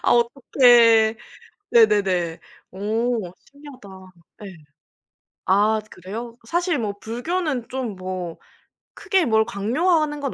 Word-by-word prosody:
아 -, -, +1 dB
어떡해. 235 Hz, -2 st, +4 dB, 0.6 s
네네네. 195 Hz, -7 st, +2 dB, 0.3 s
오 215 Hz, 0 st, -2 dB, 0.2 s
신기하다. 280 Hz, -7 st, -14 dB, 0.6 s
예. 190 Hz, -, -9 dB, 0.9 s
아 210 Hz, +3 st, +2 dB
그래요? 225 Hz, +6 st, -8 dB
사실 345 Hz, 0 st, -1 dB
뭐 210 Hz, -3 st, -3 dB
불교는 260 Hz, +2 st, -3 dB
좀 245 Hz, -6 st, -5 dB
뭐 185 Hz, -2 st, -6 dB, 0.6 s
크게 385 Hz, -4 st, 0 dB
뭘 220 Hz, -2 st, +2 dB
강요하는 295 Hz, -, 0 dB
건 275 Hz, -2 st, -4 dB
230 Hz, 190 characters per minute, -22 LUFS, 200-275 Hz, 0.9 s, 어떡해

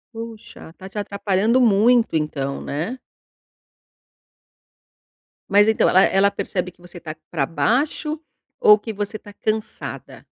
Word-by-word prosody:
Puxa, 225 Hz, -6 st, -9 dB
está 185 Hz, +3 st, -12 dB
te 200 Hz, -, -11 dB
atrapalhando 200 Hz, +3 st, +1 dB
muito, 230 Hz, 0 st, +4 dB
então, 140 Hz, -3 st, -2 dB
né? 165 Hz, -, -4 dB, 2.5 s
Mas 205 Hz, +2 st, +5 dB
então, 220 Hz, -, +3 dB
ela 190 Hz, -, +5 dB
ela 200 Hz, +1 st, +3 dB
percebe 180 Hz, -1 st, -3 dB
que 175 Hz, -, -28 dB
você 175 Hz, 0 st, -12 dB
está 155 Hz, -2 st, -7 dB
pra 145 Hz, -5 st, 0 dB
baixo, 275 Hz, -, 0 dB, 0.4 s
ou 430 Hz, -4 st, +7 dB
que 225 Hz, -, -6 dB
você 205 Hz, +2 st, -3 dB
está 205 Hz, -, -14 dB
cansada? 215 Hz, +1 st, -5 dB
205 Hz, 125 wpm, -21 LUFS, 175-230 Hz, 2.5 s, ou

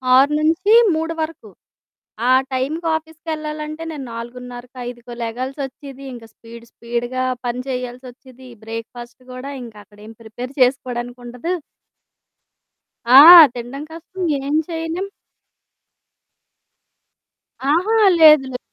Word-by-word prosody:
6-3 325 Hz, -, +3 dB
వరకు 315 Hz, +1 st, -6 dB, 0.8 s
ఆ -, -, +6 dB, 0.2 s
టైంకి 290 Hz, +6 st, -2 dB
ఆఫీస్‌కెళ్ళాలంటే 310 Hz, -1 st, -6 dB
నేను 295 Hz, -4 st, -7 dB
4:30కో, 245 Hz, +1 st, -9 dB
5కో 240 Hz, 0 st, -10 dB
లెగాల్సి 255 Hz, +5 st, -5 dB
వచ్చేది. 275 Hz, 0 st, -10 dB
ఇంక 235 Hz, -2 st, -11 dB
స్పీడ్ 230 Hz, 0 st, -14 dB
స్పీడ్‌గా 240 Hz, +2 st, -4 dB, 0.2 s
పని 245 Hz, 0 st, -3 dB
చేయాల్సి 250 Hz, 0 st, -5 dB
వచ్చేది. 255 Hz, 0 st, -17 dB, 0.2 s
బ్రేక్ 225 Hz, 0 st, -6 dB
ఫాస్ట్ 240 Hz, +1 st, -11 dB
గూడా 255 Hz, +3 st, -7 dB
ఇంకా 225 Hz, -3 st, -11 dB
అక్కడేం 210 Hz, +2 st, -15 dB
ప్రిపేర్ 235 Hz, +3 st, -8 dB
చేసుకోడానికుండదు. 245 Hz, +2 st, -2 dB, 1.6 s
ఆ! 255 Hz, +3 st, +9 dB, 0.3 s
తినడం 245 Hz, +4 st, -7 dB
కష్టం 340 Hz, +3 st, -10 dB, 0.3 s
ఏం 290 Hz, -, 0 dB
చేయలేం. 330 Hz, +3 st, -4 dB, 2.6 s
అహా! 350 Hz, +9 st, +2 dB, 0.3 s
లేదు 305 Hz, -3 st, +7 dB
లేదు. 250 Hz, -, -5 dB
260 Hz, 100 wpm, -19 LUFS, 240-310 Hz, 2.6 s, ఆ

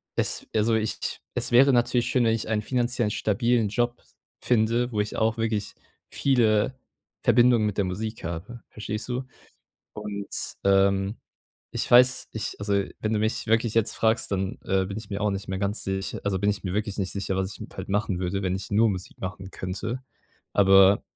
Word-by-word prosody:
es -, -, -1 dB
also 110 Hz, +1 st, +3 dB
ich 110 Hz, -1 st, -2 dB
es -, -, -2 dB
wäre 130 Hz, +3 st, +7 dB
natürlich 120 Hz, 0 st, +2 dB
schön, 125 Hz, -, +2 dB
wenn 115 Hz, -, +3 dB
ich 115 Hz, -, -4 dB
einen 110 Hz, -1 st, +1 dB
finanziell 120 Hz, -2 st, 0 dB
stabilen 115 Hz, +2 st, +1 dB
Job 120 Hz, +3 st, -1 dB, 0.4 s
finde, 120 Hz, +1 st, +2 dB
wo 105 Hz, -2 st, +1 dB
ich 105 Hz, -, -4 dB
auch 110 Hz, +1 st, +1 dB
wirklich 110 Hz, -3 st, -2 dB, 0.3 s
viele 115 Hz, -4 st, +2 dB, 0.5 s
Verbindungen 120 Hz, -1 st, +5 dB
mit 105 Hz, -2 st, -2 dB
der 100 Hz, -, +2 dB
Musik 110 Hz, +5 st, -4 dB
habe, 90 Hz, +8 st, -6 dB
verstehst 105 Hz, +1 st, -5 dB
du? 125 Hz, +2 st, -2 dB, 0.7 s
Und, 105 Hz, -1 st, -5 dB, 0.4 s
ähm, 100 Hz, +1 st, +3 dB, 0.6 s
ich -, -, -3 dB
weiß, 125 Hz, +1 st, +5 dB
ich 110 Hz, -, -4 dB
also 100 Hz, 0 st, 0 dB, 0.3 s
wenn 110 Hz, -, -1 dB
du 110 Hz, -, +1 dB
mich 110 Hz, +2 st, -1 dB
wirklich 115 Hz, 0 st, +2 dB
jetzt 115 Hz, -2 st, +2 dB
fragst, 110 Hz, +1 st, +1 dB
dann, 95 Hz, -1 st, -2 dB
äh, 95 Hz, 0 st, +1 dB
bin 100 Hz, +1 st, -6 dB
ich 110 Hz, -, -9 dB
mir 100 Hz, 0 st, -3 dB
auch 105 Hz, -, +2 dB
nicht 100 Hz, 0 st, -4 dB
mehr 95 Hz, 0 st, -2 dB
ganz 100 Hz, +2 st, -2 dB
sich 95 Hz, 0 st, -3 dB
also 100 Hz, -2 st, 0 dB
bin 100 Hz, +2 st, +2 dB
ich 100 Hz, -, -3 dB
mir 90 Hz, -, -2 dB
wirklich 105 Hz, -1 st, -2 dB
nicht 95 Hz, -3 st, -2 dB
sicher, 95 Hz, -1 st, -2 dB
was 95 Hz, +1 st, -1 dB
ich -, -, -12 dB
m -, -, -7 dB
halt -, -, -7 dB
machen 100 Hz, -2 st, 0 dB
würde, 95 Hz, +2 st, -2 dB
wenn 95 Hz, -1 st, 0 dB
ich 95 Hz, 0 st, -6 dB
nur 110 Hz, +3 st, +4 dB
Musik 90 Hz, -2 st, -6 dB
machen 95 Hz, 0 st, -6 dB
könnte. 105 Hz, +8 st, -4 dB, 0.5 s
Aber 95 Hz, 0 st, +6 dB
105 Hz, 195 wpm, -26 LUFS, 95-115 Hz, 0.7 s, wäre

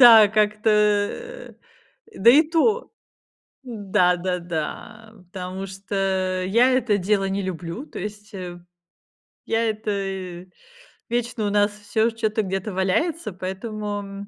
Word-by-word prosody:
Да, 225 Hz, -4 st, +10 dB
как-то, 215 Hz, +1 st, +2 dB
э, 210 Hz, -, 0 dB, 0.6 s
да 230 Hz, +5 st, +7 dB
и 290 Hz, +5 st, +7 dB
то. 340 Hz, +10 st, +1 dB, 0.7 s
Да, 195 Hz, -6 st, +1 dB
да, 180 Hz, 0 st, -2 dB
да, 215 Hz, +7 st, -6 dB, 0.2 s
потому 185 Hz, 0 st, -5 dB
что 190 Hz, -1 st, -1 dB
я 235 Hz, +6 st, +4 dB
это 245 Hz, -5 st, +2 dB
дело 195 Hz, +1 st, +1 dB
не 195 Hz, +1 st, -1 dB
люблю, 180 Hz, -, -5 dB
то -, -, -9 dB
есть, 210 Hz, +2 st, -7 dB
э. 180 Hz, -2 st, -6 dB, 0.9 s
Я 225 Hz, 0 st, +1 dB
это 215 Hz, 0 st, -3 dB, 1.2 s
вечно 235 Hz, -2 st, -1 dB
у -, -, +1 dB
нас 205 Hz, 0 st, +3 dB
всё 210 Hz, +2 st, 0 dB
чё-то 220 Hz, -1 st, -1 dB
где-то 195 Hz, +2 st, -3 dB
валяется, 215 Hz, -, 0 dB
поэтому 200 Hz, +1 st, -5 dB
210 Hz, 120 wpm, -23 LUFS, 190-225 Hz, 1.2 s, Да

